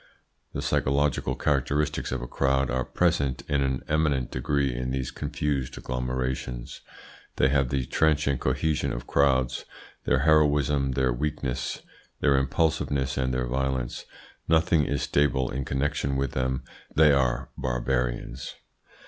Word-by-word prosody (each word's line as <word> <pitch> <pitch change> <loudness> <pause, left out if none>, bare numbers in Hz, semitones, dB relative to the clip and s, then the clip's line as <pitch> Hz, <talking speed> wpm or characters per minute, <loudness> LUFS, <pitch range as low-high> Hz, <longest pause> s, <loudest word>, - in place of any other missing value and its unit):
The - - -3
psychological 70 0 +1
characteristics 75 +1 0
of 65 -1 -3
crowds 65 -1 +1
are 65 0 0
present 70 -7 0
in 70 -1 +1
an 65 -2 -1
eminent 75 -5 +1
degree 70 +1 0
in 65 +1 -3
these 65 -1 -2
confused 70 -1 -2
agglomerations. 65 -1 -3 0.5
They 65 - +3
have 70 -2 +2
the 65 -1 -1
transient 75 -3 +2
cohesion 70 +4 0
of - - -5
crowds, 65 -3 +2 0.4
their - - +2
heroism, 75 -3 +3
their 65 -1 +1
weaknesses, 65 -2 -3 0.4
their 70 -2 +3
impulsiveness, 70 -1 +1
and 65 -1 0
their 65 0 0
violence. 65 -1 -2 0.4
Nothing 80 -2 +3
is - - -1
stable 65 -3 +1
in 65 +1 -3
connection 70 0 -1
with 70 -2 -1
them. 65 0 -1 0.3
They 75 -1 +6
are 65 -3 +1
barbarians. 60 0 -2
65 Hz, 130 wpm, -26 LUFS, 65-70 Hz, 0.5 s, They